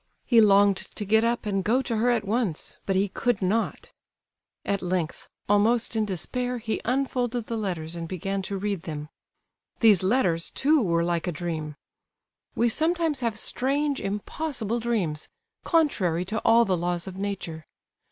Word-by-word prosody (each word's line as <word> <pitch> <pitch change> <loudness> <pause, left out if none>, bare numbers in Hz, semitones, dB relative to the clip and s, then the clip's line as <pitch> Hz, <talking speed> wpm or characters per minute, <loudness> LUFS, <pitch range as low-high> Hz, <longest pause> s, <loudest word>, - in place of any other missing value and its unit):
He 235 -3 +5
longed 200 -1 +5 0.2
to 210 - -4
get 220 +3 +4
up 235 0 0
and 195 -2 0
go 250 +6 +2
to 230 -4 -2
her 235 +3 +2
at 235 -4 +1
once—but 200 -3 -1
he 195 +2 +2
could 235 +2 -1
not. 210 +4 -1 0.7
At 200 -1 -1
length, 175 -3 -3 0.2
almost 225 +3 +3
in 220 -1 +1
despair, 245 +6 -2
he 220 -1 -3
unfolded 245 -2 -1
the 230 - -4
letters, 175 -6 -3
and 165 -1 -5
began 195 +3 -3
to 200 - -2
read 200 -2 -2
them. 150 -2 -6 0.7
These 215 -6 +6
letters, 185 -5 +2
too, 295 +1 +3
were 170 -5 +1
like 170 +1 -1
a - - 0
dream. 155 -2 -4 0.8
We 235 - +3
sometimes 320 +3 +1
have 230 -4 -1
strange, 280 +5 0
impossible 225 +3 -3
dreams, 200 -10 -1 0.3
contrary 190 - +1
to 215 +4 -2
all 235 +2 +5
the 190 -3 +1
laws 175 0 -1
of 190 - -7
nature. 190 -5 -5
205 Hz, 160 wpm, -26 LUFS, 180-240 Hz, 0.8 s, These